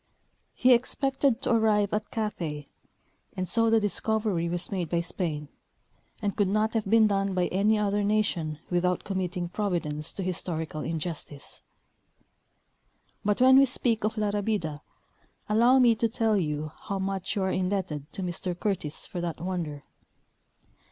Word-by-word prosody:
He 255 Hz, 0 st, +5 dB
expected 270 Hz, +1 st, +1 dB
to -, -, +1 dB
arrive 215 Hz, -2 st, +3 dB
at 210 Hz, 0 st, -1 dB
Cathay, 165 Hz, -10 st, -3 dB, 0.7 s
and 185 Hz, 0 st, -2 dB
so 230 Hz, +5 st, +3 dB
the 225 Hz, 0 st, +5 dB
discovery 210 Hz, -4 st, 0 dB
was 175 Hz, +3 st, -3 dB
made 180 Hz, -5 st, -2 dB
by 170 Hz, -1 st, +1 dB
Spain, 165 Hz, -4 st, -3 dB, 0.8 s
and 200 Hz, -1 st, 0 dB
could 205 Hz, -, +2 dB
not 215 Hz, +3 st, +1 dB
have 220 Hz, -3 st, -1 dB
been 225 Hz, 0 st, +6 dB
done 195 Hz, -2 st, +1 dB
by 180 Hz, -1 st, +2 dB
any 205 Hz, +4 st, +2 dB
other 205 Hz, 0 st, +1 dB
nation 200 Hz, -7 st, 0 dB
without 180 Hz, +1 st, +1 dB
com 195 Hz, -2 st, -2 dB
mitting 180 Hz, -1 st, -2 dB
Providence 165 Hz, -7 st, -2 dB
to 195 Hz, -, -4 dB
historical 160 Hz, -4 st, -3 dB
injustice. 160 Hz, -3 st, -5 dB, 1.6 s
But 205 Hz, +3 st, +1 dB
when 260 Hz, +1 st, +8 dB
we 275 Hz, -, +7 dB
speak 235 Hz, -3 st, 0 dB
of 215 Hz, +1 st, -1 dB
La 210 Hz, -1 st, +1 dB
Rabida, 200 Hz, -8 st, -2 dB, 0.7 s
allow 235 Hz, +5 st, +5 dB
me 245 Hz, -3 st, +6 dB
to 225 Hz, +1 st, 0 dB
tell 225 Hz, -1 st, +1 dB
you 155 Hz, -4 st, -1 dB
how 200 Hz, -, -2 dB
much 195 Hz, +1 st, -2 dB
you 200 Hz, -, 0 dB
are 190 Hz, -, 0 dB
indebted 185 Hz, -6 st, -2 dB
to 190 Hz, -, -4 dB
Mr 180 Hz, 0 st, -3 dB
Curtis 190 Hz, -8 st, -2 dB
for 175 Hz, -, -5 dB
that 170 Hz, -2 st, -3 dB
wonder. 170 Hz, -5 st, -4 dB
195 Hz, 155 wpm, -27 LUFS, 170-215 Hz, 1.6 s, when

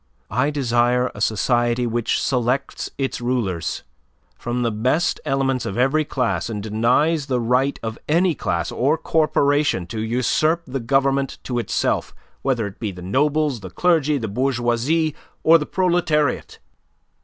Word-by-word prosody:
I 125 Hz, +5 st, +1 dB
desire 125 Hz, -3 st, +1 dB
a 105 Hz, -, -9 dB
society 120 Hz, +3 st, +1 dB
which 120 Hz, -1 st, 0 dB
selects 125 Hz, +1 st, -1 dB
its 135 Hz, -2 st, -2 dB
rulers 115 Hz, -9 st, -2 dB, 0.5 s
from 120 Hz, +1 st, -3 dB
the 115 Hz, -, +1 dB
best 125 Hz, +10 st, 0 dB
elements 135 Hz, -2 st, 0 dB
of 95 Hz, -, -4 dB
every 140 Hz, +5 st, +2 dB
class 125 Hz, -4 st, -1 dB
and 105 Hz, -3 st, -4 dB
denies 125 Hz, +8 st, +1 dB
the 130 Hz, -3 st, 0 dB
right 125 Hz, +4 st, +1 dB
of 110 Hz, 0 st, -5 dB
any 170 Hz, +3 st, +3 dB
class 85 Hz, -, -2 dB
or 145 Hz, +6 st, +1 dB
corporation 145 Hz, -, +1 dB
to 110 Hz, +5 st, -6 dB
usurp 130 Hz, +8 st, +1 dB
the 135 Hz, 0 st, -4 dB
government 135 Hz, +2 st, +1 dB
to 125 Hz, -2 st, -2 dB
itself 120 Hz, -, -1 dB, 0.3 s
whether 125 Hz, -5 st, 0 dB
it 100 Hz, -1 st, -8 dB
be 110 Hz, -4 st, -3 dB
the 90 Hz, -1 st, -10 dB
nobles, 145 Hz, +6 st, +1 dB
the 95 Hz, -2 st, -8 dB
clergy, 155 Hz, -, +2 dB
the 115 Hz, -4 st, -3 dB
bourgeoisie, 130 Hz, +6 st, 0 dB, 0.3 s
or 165 Hz, +1 st, +7 dB
the 150 Hz, -, -4 dB
proletariat. 170 Hz, -6 st, 0 dB
125 Hz, 145 wpm, -21 LUFS, 115-145 Hz, 0.5 s, or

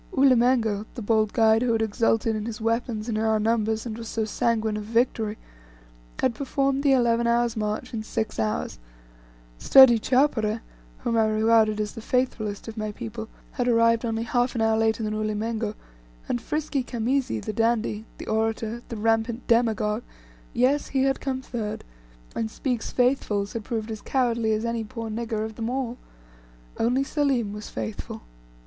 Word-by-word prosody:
Ulimengo, 240 Hz, -5 st, +3 dB
the 235 Hz, -, -5 dB
bold 215 Hz, 0 st, +2 dB
guide 225 Hz, 0 st, +4 dB
who 245 Hz, -2 st, +2 dB
had 225 Hz, -, +1 dB
exulted 225 Hz, +1 st, +1 dB
in 215 Hz, +1 st, -3 dB
his 230 Hz, -1 st, -5 dB
weapons 230 Hz, 0 st, -1 dB
and 220 Hz, -2 st, -1 dB
in -, -, 0 dB
our 220 Hz, -1 st, +2 dB
numbers, 220 Hz, 0 st, 0 dB
and 225 Hz, -2 st, -4 dB
was 230 Hz, -, -7 dB
so 220 Hz, -1 st, -1 dB
sanguine 220 Hz, 0 st, 0 dB
of 210 Hz, -, -4 dB
victory, 225 Hz, -1 st, 0 dB, 0.8 s
had -, -, +2 dB
performed 275 Hz, +1 st, 0 dB
the 280 Hz, -1 st, +3 dB
eleven 235 Hz, -2 st, +3 dB
hours' 235 Hz, 0 st, +2 dB
march 215 Hz, +3 st, -3 dB
in 225 Hz, -, -2 dB
six 220 Hz, 0 st, -3 dB
hours; 105 Hz, -, -2 dB, 0.8 s
sturdy 260 Hz, -4 st, +8 dB
Chowpereh, 230 Hz, -4 st, +1 dB, 0.4 s
whom 230 Hz, -, 0 dB
I 220 Hz, -1 st, +4 dB
regarded 215 Hz, 0 st, +3 dB
as 210 Hz, -1 st, -1 dB
the 225 Hz, -, -9 dB
faithfullest 220 Hz, -4 st, -1 dB
of 225 Hz, 0 st, -7 dB
my 215 Hz, -1 st, -2 dB
people, 225 Hz, 0 st, -7 dB, 0.2 s
had 245 Hz, -3 st, -2 dB
arrived 230 Hz, -1 st, +4 dB
only 225 Hz, -1 st, -1 dB
half 245 Hz, +1 st, 0 dB
an 230 Hz, -, 0 dB
hour 225 Hz, 0 st, +3 dB
later 225 Hz, 0 st, +1 dB
than 215 Hz, 0 st, -2 dB
Ulimengo; 215 Hz, 0 st, -2 dB, 0.5 s
and 240 Hz, -, -1 dB
frisky 295 Hz, 0 st, -2 dB
Khamisi, 245 Hz, -, -1 dB
the 215 Hz, -, -5 dB
dandy 225 Hz, -1 st, 0 dB
the -, -, -8 dB
orator 225 Hz, +1 st, -1 dB
the 230 Hz, -, -5 dB
rampant 225 Hz, +2 st, 0 dB
demagogue 225 Hz, -2 st, +2 dB, 0.5 s
yes 260 Hz, +4 st, +2 dB
he 265 Hz, -1 st, +1 dB
had 270 Hz, 0 st, +1 dB
come 260 Hz, -1 st, -3 dB
third; 220 Hz, -5 st, -4 dB, 0.5 s
and 225 Hz, -, -1 dB
Speke's 245 Hz, 0 st, -3 dB
"Faithfuls" 245 Hz, -5 st, +1 dB
had 230 Hz, -2 st, -4 dB
proved 225 Hz, -1 st, -3 dB
as 215 Hz, -, -6 dB
cowardly 235 Hz, -4 st, +1 dB
as 215 Hz, +2 st, -1 dB
any 230 Hz, -1 st, -1 dB
poor 225 Hz, +1 st, -6 dB
"nigger" 220 Hz, -1 st, -2 dB
of 220 Hz, -, -6 dB
them 225 Hz, 0 st, -2 dB
all. 250 Hz, -1 st, -3 dB, 0.8 s
Only 250 Hz, +4 st, +2 dB
Selim 270 Hz, -7 st, 0 dB
was 210 Hz, 0 st, -7 dB
faithful. 110 Hz, -, -6 dB
225 Hz, 170 wpm, -25 LUFS, 215-240 Hz, 0.8 s, sturdy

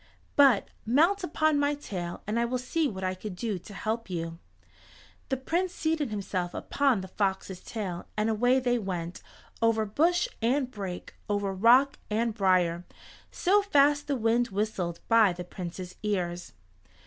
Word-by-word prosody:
But 270 Hz, -8 st, +5 dB, 0.2 s
mount 330 Hz, -, +3 dB
upon 310 Hz, -3 st, +2 dB
my 290 Hz, 0 st, +2 dB
tail 180 Hz, -11 st, -6 dB
and 215 Hz, +3 st, -1 dB
I -, -, +2 dB
will 250 Hz, +2 st, -1 dB
see 300 Hz, +5 st, 0 dB
what 190 Hz, -6 st, -5 dB
I 185 Hz, 0 st, 0 dB
can 185 Hz, +1 st, -7 dB
do 210 Hz, -1 st, -3 dB
to 190 Hz, +4 st, -12 dB
help 220 Hz, +1 st, -3 dB
you." 165 Hz, -2 st, -4 dB, 0.9 s
The 265 Hz, -, 0 dB
Prince 345 Hz, +7 st, -1 dB
seated 315 Hz, -3 st, 0 dB
himself 190 Hz, -4 st, -3 dB
upon 275 Hz, -8 st, +1 dB
the 190 Hz, -, -7 dB
fox's 190 Hz, -1 st, -2 dB
tail 190 Hz, -6 st, -5 dB
and 215 Hz, +1 st, +1 dB
away 245 Hz, +4 st, +3 dB
they 245 Hz, -1 st, +1 dB
went, 180 Hz, -4 st, -4 dB, 0.4 s
over 225 Hz, -1 st, +3 dB
bush 335 Hz, -, +2 dB
and 255 Hz, +3 st, +1 dB
brake, 195 Hz, -5 st, -6 dB, 0.2 s
over 205 Hz, -1 st, 0 dB
rock 245 Hz, +8 st, +5 dB
and 225 Hz, +2 st, 0 dB
brier, 180 Hz, -4 st, +2 dB, 0.5 s
so 400 Hz, +3 st, +3 dB
fast 290 Hz, -6 st, +3 dB
the 285 Hz, -, 0 dB
wind 235 Hz, 0 st, +2 dB
whistled 195 Hz, -5 st, -2 dB
by 225 Hz, -5 st, +5 dB
the 180 Hz, 0 st, -6 dB
Prince's 180 Hz, 0 st, -7 dB
ears. 180 Hz, -4 st, -2 dB
220 Hz, 160 wpm, -28 LUFS, 185-275 Hz, 0.9 s, But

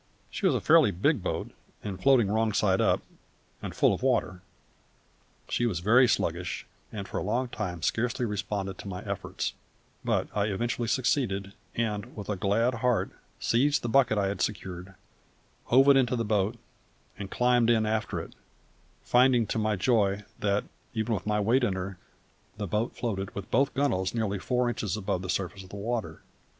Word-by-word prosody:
She -, -, 0 dB
was -, -, +3 dB
a -, -, 0 dB
fairly -, -, +6 dB
big 130 Hz, -, +1 dB
boat -, -, -3 dB, 0.3 s
and, 95 Hz, -3 st, -5 dB
floating 130 Hz, -6 st, +5 dB
wrong 110 Hz, +1 st, +1 dB
side 95 Hz, -2 st, +2 dB
up -, -, +2 dB, 0.6 s
and -, -, -6 dB
full -, -, +4 dB
of -, -, -4 dB
water, 90 Hz, 0 st, 0 dB, 1.1 s
she 120 Hz, -, 0 dB
was 95 Hz, -7 st, -1 dB
very 120 Hz, +7 st, +6 dB
sluggish, 90 Hz, -5 st, -1 dB, 0.3 s
and 100 Hz, -2 st, -6 dB
for -, -, -3 dB
a -, -, -3 dB
long 120 Hz, +6 st, -1 dB
time 90 Hz, -8 st, -4 dB
scarcely 120 Hz, +1 st, 0 dB
responded 100 Hz, -2 st, -3 dB
to -, -, -8 dB
my 90 Hz, -1 st, -5 dB
efforts; -, -, -3 dB, 0.5 s
but -, -, 0 dB
I 100 Hz, -1 st, +2 dB
eventually 115 Hz, +3 st, -1 dB
succeeded, 110 Hz, -6 st, 0 dB, 0.2 s
and, 105 Hz, -3 st, -2 dB
with 105 Hz, -1 st, -7 dB
a 105 Hz, -, 0 dB
glad 105 Hz, +6 st, +1 dB
heart, 125 Hz, -2 st, +1 dB, 0.3 s
seized 140 Hz, +5 st, +2 dB
the 120 Hz, -, -1 dB
bucket 125 Hz, -3 st, +4 dB
I 100 Hz, -1 st, +1 dB
had 100 Hz, -2 st, -4 dB
secured, 95 Hz, -2 st, -4 dB, 0.7 s
hove 135 Hz, +3 st, +5 dB
it 140 Hz, -, +7 dB
into 125 Hz, -2 st, +2 dB
the 115 Hz, -2 st, -1 dB
boat, 105 Hz, +2 st, +1 dB, 0.6 s
and 100 Hz, -2 st, -5 dB
climbed 125 Hz, 0 st, +3 dB
in 110 Hz, -2 st, +3 dB
after 110 Hz, 0 st, -1 dB
it, -, -, -8 dB, 0.7 s
finding 125 Hz, -1 st, +4 dB
to 110 Hz, -, -2 dB
my 110 Hz, -1 st, +1 dB
joy 100 Hz, -1 st, +2 dB, 0.2 s
that, 100 Hz, 0 st, +1 dB, 0.3 s
even 110 Hz, +1 st, 0 dB
with 105 Hz, -1 st, -3 dB
my 105 Hz, 0 st, +1 dB
weight 120 Hz, +6 st, +2 dB
in 105 Hz, -5 st, +2 dB
her, 95 Hz, 0 st, -5 dB, 0.6 s
the 105 Hz, -, -3 dB
boat 105 Hz, +5 st, -1 dB
floated 100 Hz, -5 st, -3 dB
with 100 Hz, -, -6 dB
both 135 Hz, +2 st, +2 dB
gunwales 120 Hz, -9 st, 0 dB
nearly 105 Hz, -4 st, -1 dB
four 125 Hz, +4 st, 0 dB
inches 110 Hz, -4 st, -2 dB
above 95 Hz, -3 st, -2 dB
the 95 Hz, -, -6 dB
surface 95 Hz, +1 st, -2 dB
of 95 Hz, -, -13 dB
the -, -, -9 dB
water. 115 Hz, +3 st, -3 dB
105 Hz, 180 wpm, -28 LUFS, 100-120 Hz, 1.1 s, it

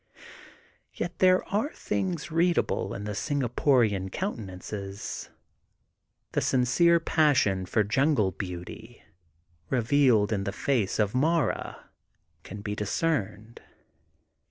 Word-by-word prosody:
Yet 175 Hz, 0 st, -5 dB
there 185 Hz, 0 st, +4 dB
are 220 Hz, +10 st, 0 dB
things 175 Hz, -4 st, -3 dB
readable 170 Hz, +2 st, +1 dB
in 100 Hz, -, -6 dB
the 105 Hz, -, -4 dB
Singaporian 120 Hz, -6 st, +1 dB
countenances. 100 Hz, -, -5 dB, 1.0 s
The -, -, 0 dB
sincere 150 Hz, +7 st, +3 dB
passion 135 Hz, -, +2 dB
for 105 Hz, +4 st, +2 dB
jungle 120 Hz, -2 st, +2 dB
beauty 95 Hz, +6 st, -8 dB, 0.7 s
re 130 Hz, -, +1 dB
vealed 115 Hz, -4 st, +3 dB
in 100 Hz, -3 st, 0 dB
the 100 Hz, -, -2 dB
face 110 Hz, -1 st, 0 dB
of 105 Hz, -2 st, +1 dB
Mara 150 Hz, 0 st, -1 dB, 0.5 s
can 100 Hz, +1 st, -9 dB
be 105 Hz, 0 st, -4 dB
discerned. 110 Hz, -, -2 dB
120 Hz, 105 wpm, -27 LUFS, 100-155 Hz, 1.0 s, there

